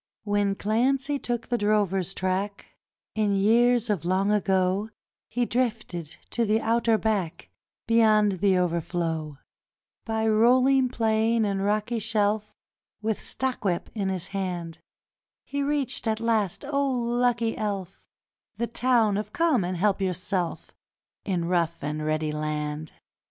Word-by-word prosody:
When 205 -1 +1
Clancy 265 +7 +1
took 240 -2 -3
the 240 -1 0
drover's 200 -3 +1
track 190 +2 -2 0.5
In 210 -2 +1
years 235 +4 +3
of 205 -7 -1
long 190 +3 +1
ago, 190 0 +1 0.4
He 240 +2 0
drifted 215 - -2 0.2
to 235 - +1
the 220 0 +2
outer 230 0 +2
back 205 -7 -2 0.3
Beyond 215 -4 +3
the 195 -1 +3
Overflow; 165 -3 -2 0.7
By 220 -1 0
rolling 255 +4 +4
plain 225 -1 +1
and 195 -1 -1
rocky 215 +3 0
shelf, 215 -1 0 0.5
With 220 -1 -1
stockwhip 210 -9 -1
in 200 -3 -1
his 190 -1 -4
hand, 180 -4 -4 0.6
He 285 +1 -3
reached 280 -4 0
at 220 0 0
last, 225 -1 0
oh 280 -1 +1
lucky 240 -1 +1
elf, 195 -3 -5 0.5
The 235 - 0
Town 235 -3 +2
of 210 0 -4
Come 315 - +2
and 180 +1 -2
help 200 +2 +1
yourself 180 -1 -2 0.5
In 180 -4 -1
Rough 170 -1 0
and 150 +1 -3
ready 155 0 -1
Land. 150 0 -3
210 Hz, 130 wpm, -26 LUFS, 185-230 Hz, 0.7 s, rolling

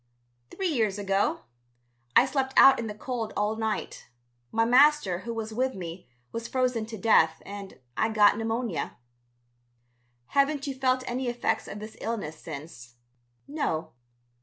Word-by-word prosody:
"Three 380 -2 -2
years 220 -9 0
ago. 195 0 0 0.7
I 245 - +8
slept 265 0 -2
out 270 0 +8
in 230 - -3
the 210 - -6
cold 230 -1 -4
all 210 +1 +1
night. 220 -1 -3 0.4
My 225 0 +2
master, 255 -7 +4
who 235 +5 -6
was 225 -1 -4
with 260 +3 0
me, 170 -6 -8 0.2
was 230 0 -5
frozen 250 -4 0
to 225 -1 -7
death, 160 -6 +4
and 200 -1 -9 0.2
I 220 - +1
got 210 -2 +5
pneumonia." 225 -3 -2 1.3
"Haven't 280 0 +2
you 275 - -2
felt 260 -1 +1
any 255 +1 -2
effects 240 -2 -1
of - - -7
this 215 +1 -9
illness 210 -9 -3
since?" 140 -6 -9 0.5
"No." 280 - -2
225 Hz, 145 wpm, -27 LUFS, 205-255 Hz, 1.3 s, I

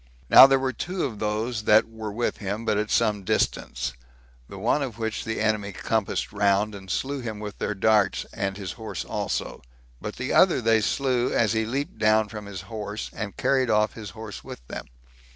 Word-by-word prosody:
Now 135 - +11
there 135 0 +4
were 130 0 -1
two 180 +9 -3
of 110 -7 -5
those 110 +1 -2
that 110 +1 +5
were 110 -2 -6
with 120 +3 -1
him, 105 +3 -4
but 105 - +2
at 105 0 -2
some 105 -2 +2
distance; 60 -8 -1 0.6
the - - -9
one 150 - +1
of 125 -6 -4
which 110 -2 -3
the 110 - -2
enemy 110 -2 0
compassed 110 +2 -1
round, 100 +1 +2
and 95 -2 -10
slew 140 +10 -1
him 110 -3 -5
with 105 -1 -7
their 105 - -2
darts, 105 0 +2
and 100 -3 -2
his 95 -3 -5
horse 110 -1 -6
also; - - -3 0.4
but 105 - -5
the 130 +1 -3
other 185 -2 +5
they 115 -2 +3
slew 125 +1 +1
as 115 -2 +2
he 110 0 +1
leaped 135 0 -3
down 110 -1 +3
from 105 -2 -8
his 100 -2 -6
horse, 105 -2 -6
and 105 -3 -5
carried 130 -3 +2
off 105 -1 +2
his 110 -3 -8
horse 110 -2 -8
with - - -10
them. - - -7
110 Hz, 200 wpm, -25 LUFS, 105-115 Hz, 0.6 s, Now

